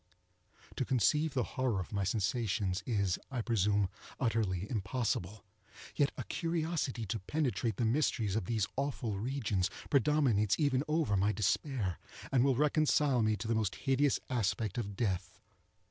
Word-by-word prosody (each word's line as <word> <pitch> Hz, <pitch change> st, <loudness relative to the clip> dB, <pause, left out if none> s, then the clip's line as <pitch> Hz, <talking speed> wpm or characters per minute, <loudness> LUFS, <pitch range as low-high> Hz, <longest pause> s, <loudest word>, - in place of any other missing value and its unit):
To -, -, +1 dB
conceive 135 Hz, +6 st, +2 dB
the 125 Hz, -, +2 dB
horror 130 Hz, -6 st, -1 dB
of 90 Hz, +2 st, -6 dB
my 100 Hz, -1 st, 0 dB
sensations 100 Hz, -2 st, 0 dB
is, 100 Hz, -6 st, +1 dB
I 125 Hz, -4 st, -3 dB
presume, 105 Hz, -3 st, +2 dB, 0.3 s
utterly 105 Hz, -6 st, 0 dB
impossible; 105 Hz, -2 st, -2 dB, 0.5 s
yet 145 Hz, -2 st, +2 dB
a -, -, -3 dB
curiosity 160 Hz, -8 st, -2 dB
to 110 Hz, +3 st, -3 dB
penetrate 120 Hz, -2 st, -1 dB
the 120 Hz, -, +1 dB
mysteries 110 Hz, -5 st, +1 dB
of 110 Hz, -, -1 dB
these 110 Hz, -1 st, 0 dB
awful 125 Hz, -7 st, -2 dB
regions, 110 Hz, -6 st, 0 dB, 0.2 s
predominates 130 Hz, -7 st, +3 dB
even 140 Hz, -3 st, +2 dB
over 150 Hz, -9 st, +1 dB
my 100 Hz, +2 st, +3 dB
despair, 105 Hz, -, -1 dB, 0.3 s
and 130 Hz, -3 st, +4 dB
will 135 Hz, -1 st, +3 dB
reconcile 150 Hz, -2 st, +3 dB
me 110 Hz, 0 st, +2 dB
to 110 Hz, -, -5 dB
the 115 Hz, -, +1 dB
most 110 Hz, -3 st, 0 dB
hideous 135 Hz, 0 st, +2 dB
aspect 110 Hz, -3 st, -1 dB
of 100 Hz, -3 st, -4 dB
death. 95 Hz, -4 st, -2 dB
115 Hz, 145 wpm, -33 LUFS, 100-135 Hz, 0.5 s, and